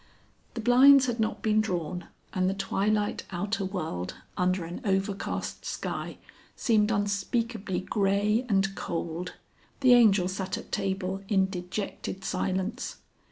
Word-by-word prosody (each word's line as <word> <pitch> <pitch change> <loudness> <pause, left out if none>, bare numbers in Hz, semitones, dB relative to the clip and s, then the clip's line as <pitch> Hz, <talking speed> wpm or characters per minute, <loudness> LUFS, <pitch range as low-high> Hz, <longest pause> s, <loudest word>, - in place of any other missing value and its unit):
The 230 - -3
blinds 260 +4 +7
had 240 -2 -2
not 220 0 -1
been 215 0 +3
drawn, 180 -4 -3 0.3
and 185 0 +2
the 195 - -1
twilight 205 +2 0
outer 200 +3 -2
world 160 - -3 0.2
under 180 -1 +1
an 170 +2 -7
overcast 195 0 -2
sky - - -4 0.4
seemed 215 -3 +2
unspeakably 205 -1 -1
grey 200 +3 +1
and 195 -1 +2
cold. 170 -1 -4 0.5
The 255 -2 +7
Angel 210 -6 +6
sat 190 0 -3
at - - -10
table 195 -1 -2
in 190 -2 +2
dejected 190 +1 -5
silence. 190 +2 -2
195 Hz, 125 wpm, -28 LUFS, 185-215 Hz, 0.5 s, blinds